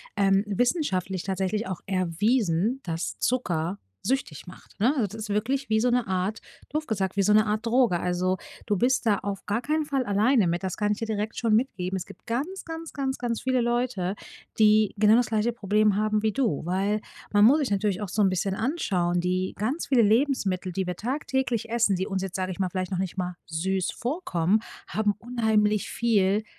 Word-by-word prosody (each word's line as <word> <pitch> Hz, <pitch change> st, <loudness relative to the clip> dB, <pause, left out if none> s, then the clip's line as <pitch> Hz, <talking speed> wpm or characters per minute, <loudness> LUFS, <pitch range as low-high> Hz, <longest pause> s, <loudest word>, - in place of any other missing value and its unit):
ähm, 195 Hz, 0 st, +3 dB
wissenschaftlich 195 Hz, -, 0 dB
tatsächlich 190 Hz, +2 st, -1 dB
auch 185 Hz, -, -5 dB
erwiesen, 195 Hz, +4 st, +1 dB
dass 165 Hz, -1 st, -4 dB
Zucker 185 Hz, -7 st, -1 dB, 0.3 s
süchtig 255 Hz, -, -2 dB
macht, 180 Hz, -, -14 dB
ne? 255 Hz, +6 st, +4 dB
Das 205 Hz, -2 st, -1 dB
ist 215 Hz, -1 st, -6 dB
wirklich 240 Hz, +6 st, -1 dB
wie 220 Hz, 0 st, +3 dB
so 245 Hz, +2 st, +2 dB
'ne 245 Hz, -3 st, +1 dB
Art 190 Hz, +3 st, -1 dB, 0.3 s
doof 305 Hz, +1 st, -3 dB
gesagt, 195 Hz, -3 st, -1 dB
wie 200 Hz, -, +2 dB
so 210 Hz, -, +3 dB
'ne 215 Hz, +1 st, +5 dB
Art 215 Hz, +2 st, -1 dB
Droge. 230 Hz, -7 st, +3 dB
Also, 180 Hz, +1 st, 0 dB, 0.3 s
du 205 Hz, -, +1 dB
bist 250 Hz, +4 st, +1 dB
da 205 Hz, -3 st, +3 dB
auf 200 Hz, -1 st, -5 dB
gar 220 Hz, +4 st, -1 dB
keinen 305 Hz, +3 st, 0 dB
Fall 275 Hz, -3 st, 0 dB
alleine 210 Hz, +2 st, +3 dB
mit, 175 Hz, +2 st, -1 dB
das 185 Hz, -, -2 dB
kann 210 Hz, 0 st, 0 dB
ich 210 Hz, -, 0 dB
dir 225 Hz, -, -3 dB
direkt 215 Hz, 0 st, -3 dB
schon 225 Hz, -3 st, +2 dB
mitgeben. 190 Hz, -6 st, -1 dB
Es 185 Hz, -, -3 dB
gibt 200 Hz, -, -15 dB
ganz, 295 Hz, +12 st, -3 dB
ganz, 325 Hz, -1 st, -7 dB
ganz, 270 Hz, -2 st, -2 dB
ganz 235 Hz, -2 st, -2 dB
viele 255 Hz, -1 st, +2 dB
Leute, 240 Hz, -6 st, -1 dB, 0.4 s
die 215 Hz, -1 st, +5 dB
genau 215 Hz, +1 st, +6 dB
das 245 Hz, -1 st, +3 dB
gleiche 220 Hz, +2 st, 0 dB
Problem 210 Hz, -2 st, +2 dB
haben 215 Hz, 0 st, +1 dB
wie 215 Hz, -2 st, 0 dB
du. 235 Hz, -, 0 dB
Weil 195 Hz, +4 st, 0 dB, 0.3 s
man 205 Hz, 0 st, +6 dB
muss 285 Hz, +6 st, +6 dB
sich 265 Hz, -8 st, -1 dB
natürlich 200 Hz, 0 st, 0 dB
auch 200 Hz, -, -4 dB
so 215 Hz, -, 0 dB
'n 195 Hz, -, +5 dB
bisschen 190 Hz, +1 st, -1 dB
anschauen, 185 Hz, -, 0 dB
die 185 Hz, +1 st, -1 dB
ganz 255 Hz, +11 st, -2 dB
viele 255 Hz, -4 st, +4 dB
Lebensmittel, 205 Hz, -6 st, +1 dB
die 190 Hz, 0 st, -1 dB
wir 180 Hz, -1 st, -4 dB
tagtäglich 255 Hz, -2 st, -2 dB
essen, 230 Hz, -4 st, +2 dB
die 190 Hz, +1 st, -1 dB
uns 190 Hz, -2 st, -2 dB
jetzt, 190 Hz, -1 st, -5 dB
sage 185 Hz, 0 st, -2 dB
ich 185 Hz, -, -7 dB
mal, 190 Hz, -, +1 dB
vielleicht 185 Hz, +1 st, -3 dB
noch 185 Hz, -, -1 dB
nicht 190 Hz, -2 st, -3 dB
mal 180 Hz, -1 st, -3 dB
süß 185 Hz, +3 st, -1 dB
vorkommen, 220 Hz, -, 0 dB, 0.3 s
haben 210 Hz, -1 st, 0 dB
unheimlich 220 Hz, -3 st, +1 dB
viel 210 Hz, -3 st, +2 dB
210 Hz, 205 wpm, -26 LUFS, 190-240 Hz, 0.4 s, genau